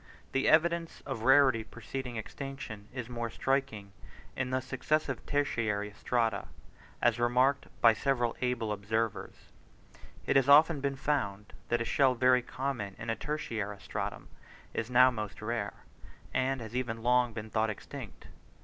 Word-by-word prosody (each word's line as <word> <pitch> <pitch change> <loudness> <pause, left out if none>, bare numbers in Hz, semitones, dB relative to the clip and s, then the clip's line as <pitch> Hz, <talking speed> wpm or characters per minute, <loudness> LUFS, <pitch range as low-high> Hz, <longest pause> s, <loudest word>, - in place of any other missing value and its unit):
The 135 - +2
evidence 170 +1 +2
of 135 -5 -4
rarity 130 -2 +5
preceding 120 +3 -6
extinction, 110 -2 -7
is 125 -3 -5
more 120 -1 -4
striking 130 -6 -1 0.4
in 125 -1 -2
the 130 0 +1
successive 135 +1 -1
tertiary 110 -8 0
strata, 115 -4 0 0.6
as 120 0 +3
remarked 125 +3 +2
by 115 -1 +7
several 120 -1 0
able 125 -4 0
observers; 105 +1 -3 0.8
it - - +1
has 135 0 +4
often 150 +1 +7
been 140 0 -1
found 105 -8 -2 0.2
that 120 0 +1
a - - -1
shell 130 0 +3
very 125 +1 +4
common 125 -6 -4
in 115 - -3
a - - -1
tertiary 110 -10 -3
stratum 80 - -5 0.4
is 110 - -3
now 125 +1 +6
most 105 -4 -5
rare, 105 -2 -4 0.5
and 130 0 0
has 115 +1 -8
even 115 -3 -2
long 125 0 +3
been 110 -1 -7
thought 110 0 +1
extinct. 105 - -8
120 Hz, 145 wpm, -31 LUFS, 110-135 Hz, 0.8 s, by